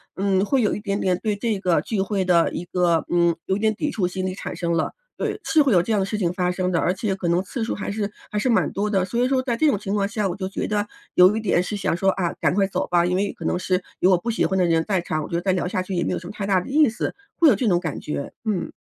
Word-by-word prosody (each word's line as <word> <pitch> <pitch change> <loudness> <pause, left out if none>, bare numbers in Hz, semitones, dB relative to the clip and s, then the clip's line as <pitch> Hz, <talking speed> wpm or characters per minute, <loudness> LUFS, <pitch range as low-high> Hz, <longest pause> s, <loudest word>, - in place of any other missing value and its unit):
嗯， 195 0 +1
会 265 +4 +2
有 210 - +1
一 - - -4
点 200 -1 -2
点 180 -1 +1
对 215 -2 0
这 210 0 -1
个 180 -3 +2
聚 220 - -3
会 195 0 0
的 170 -2 +3
一 175 - -4
个， 175 -2 +1
嗯， 170 -1 +3
有 190 - +1
一 - - -5
点 220 0 +2
抵 300 - -2
触 195 -8 0
心 185 +1 -4
理 185 - -3
产 - - -6
生 170 -1 -1
了。 165 -1 0 0.2
对， - - -2
是 315 - +4
会 280 -3 +3
有 175 -4 +4
这 225 - -3
样 210 - +2
的 190 - +1
事 210 +2 -3
情 180 -4 0
发 180 -1 0
生 185 0 -1
的， 170 - +1
而 175 - +2
且 200 +1 -2
可 190 -2 -3
能 175 +2 +2
次 225 +4 -4
数 225 - -2
还 200 - -4
是 205 0 -2 0.2
还 210 - -1
是 255 - 0
蛮 235 - +2
多 205 +2 -1
的， 190 -3 +1
所 235 +6 0
以 - - +3
说 265 0 +2
在 245 -3 -1
这 310 +7 +2
种 270 - +1
情 195 0 -4
况 200 -1 +1
下， 210 0 -1
我 175 - -3
就 190 -1 -4
觉 - - -3
得 210 -1 -1 0.3
有 185 +3 +6
一 - - 0
点 195 -5 +2
是 195 +3 -4
想 195 - 0
说： 195 +3 +2
“啊， 175 -3 0
赶 - - +2
快 200 -1 +3
走 195 - -2
吧。” 175 -1 +3
因 180 +1 0
为 200 +1 0
可 - - -9
能 180 - 0
是 185 0 0 0.2
有 185 - +4
我 185 - +5
不 235 +7 -3
喜 220 - +1
欢 190 +3 -1
的 180 - +3
人 165 -1 +2
在 195 -3 +1
场， 155 -2 -2
我 - - -6
觉 - - -3
得 170 - 0
再 190 - +2
聊 180 -1 0
下 185 0 -1
去 190 - -6
也 175 - 0
没 - - -1
有 - - -1
什 180 - -9
么 190 - -7
太 200 -2 -4
大 195 -2 +3
的 180 - -7
意 300 -1 +5
思， 225 - -3 0.2
会 330 - +5
有 - - +6
这 225 +4 -1
种 175 -4 +3
感 160 -5 -4
觉， 145 -2 -5
嗯。 205 -5 -1
190 Hz, 355 characters per minute, -23 LUFS, 180-210 Hz, 0.3 s, 有